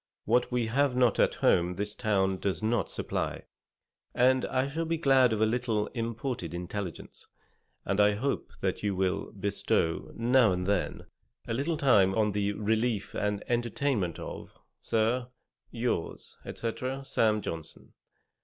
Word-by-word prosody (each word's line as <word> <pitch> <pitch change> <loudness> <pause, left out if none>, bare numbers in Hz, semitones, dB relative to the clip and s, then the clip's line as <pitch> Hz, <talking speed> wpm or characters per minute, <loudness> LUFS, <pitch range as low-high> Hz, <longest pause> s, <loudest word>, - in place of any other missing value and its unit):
What 120 +4 +2
we 125 -1 +1
have 130 +3 +1
not 125 -4 +3
at - - +3
home 90 +1 +3
this 105 +2 -3
town 95 -4 +1
does 100 +2 -2
not 110 -4 +1
supply, - - -3 0.7
and 130 +1 +4
I 130 +1 0
shall 160 +4 -3
be 165 0 -1
glad 135 -5 +4
of 110 -1 0
a - - +6
little 110 -2 0
imported 115 - -3
intelligence, 90 +1 -6 0.6
and 100 +1 0
hope 105 +7 +1
that - - -1
you 100 -2 -1
will 95 0 -1
bestow, 95 -4 -1
now 120 -3 +4
and 90 0 -2
then, 90 -6 -1 0.4
a 115 - -2
little 150 +7 -1
time 100 -10 +4
on 105 -1 +2
the 100 0 0
relief 110 0 -1
and 105 -1 -1
entertainment 120 - 0
of, - - -8 0.2
Sir, 115 +3 0 0.4
'Yours, 120 -7 -3 0.2
&c. 115 - -3 0.3
'Sam. 110 -5 +2
Johnson.' 80 -2 -7
110 Hz, 145 wpm, -29 LUFS, 100-125 Hz, 0.7 s, a